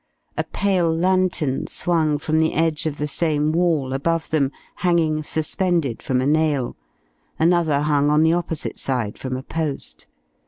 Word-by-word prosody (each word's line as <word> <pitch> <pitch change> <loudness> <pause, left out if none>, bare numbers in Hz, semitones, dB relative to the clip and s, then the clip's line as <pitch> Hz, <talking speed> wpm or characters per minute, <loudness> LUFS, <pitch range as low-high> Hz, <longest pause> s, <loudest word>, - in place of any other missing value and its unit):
A - - 0
pale 185 -4 +1
lantern 175 -5 +1
swung 160 -4 +1
from 155 +2 0
the 160 0 +1
edge 160 0 +1
of 150 -2 -3
the 150 - -2
same 150 0 0
wall, 160 -6 +1
above 165 +4 -1
them, 140 -4 +2 0.3
hanging 165 -4 +1
suspended 160 -3 -1
from 130 -1 0
a - - 0
nail; 150 -3 +1 0.6
another 160 -3 +2
hung 145 -1 +2
on 150 +1 +4
the 160 +1 +4
opposite 170 -3 -2
side 125 -6 -2
from 130 -1 -3
a 130 - -7
post. 155 -2 -4
155 Hz, 155 wpm, -22 LUFS, 145-165 Hz, 0.6 s, on